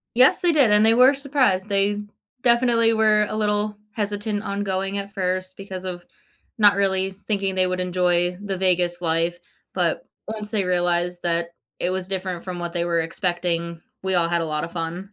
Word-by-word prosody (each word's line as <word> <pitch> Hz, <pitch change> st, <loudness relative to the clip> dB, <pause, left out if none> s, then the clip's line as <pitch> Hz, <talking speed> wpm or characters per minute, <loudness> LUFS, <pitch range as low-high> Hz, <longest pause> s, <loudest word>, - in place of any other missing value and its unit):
Yes, 255 Hz, +2 st, +5 dB
they 350 Hz, -, +3 dB
did 275 Hz, -8 st, +4 dB
and 210 Hz, +1 st, +5 dB
they 225 Hz, +1 st, +5 dB
were 255 Hz, +3 st, +6 dB
surprised. 260 Hz, -9 st, +1 dB
They 205 Hz, +1 st, +1 dB, 0.4 s
definitely 235 Hz, -2 st, +3 dB
were 215 Hz, -1 st, +3 dB
a 215 Hz, -, -4 dB
little 210 Hz, 0 st, 0 dB, 0.2 s
hesitant 205 Hz, 0 st, -2 dB
ongoing 200 Hz, -1 st, -2 dB
at 200 Hz, 0 st, -6 dB
first 185 Hz, 0 st, -2 dB
because 190 Hz, -1 st, -7 dB
of 175 Hz, -1 st, -6 dB, 0.5 s
not 205 Hz, -3 st, +6 dB
really 190 Hz, -1 st, +1 dB
thinking 195 Hz, -1 st, -3 dB
they 185 Hz, 0 st, +3 dB
would 185 Hz, 0 st, -2 dB
enjoy 180 Hz, -1 st, +1 dB
the 195 Hz, -2 st, -3 dB
Vegas 180 Hz, -1 st, +1 dB
life. 165 Hz, +1 st, 0 dB, 0.3 s
But, -, -, 0 dB, 0.2 s
once 215 Hz, -1 st, -4 dB
they 205 Hz, -3 st, +1 dB
realized 175 Hz, 0 st, 0 dB
that 170 Hz, 0 st, 0 dB, 0.3 s
it 180 Hz, -, 0 dB
was 185 Hz, 0 st, -3 dB
different 185 Hz, -2 st, -3 dB
from 180 Hz, -2 st, -5 dB
what 175 Hz, 0 st, -5 dB
they 170 Hz, 0 st, -1 dB
were 170 Hz, -1 st, +1 dB
expecting, 170 Hz, -1 st, -2 dB, 0.2 s
we 190 Hz, 0 st, -1 dB
all 170 Hz, -1 st, +2 dB
had 170 Hz, 0 st, +1 dB
a -, -, -2 dB
lot 150 Hz, -1 st, -2 dB
of 170 Hz, -, -5 dB
fun. 165 Hz, 0 st, -4 dB
190 Hz, 185 wpm, -23 LUFS, 175-210 Hz, 0.5 s, were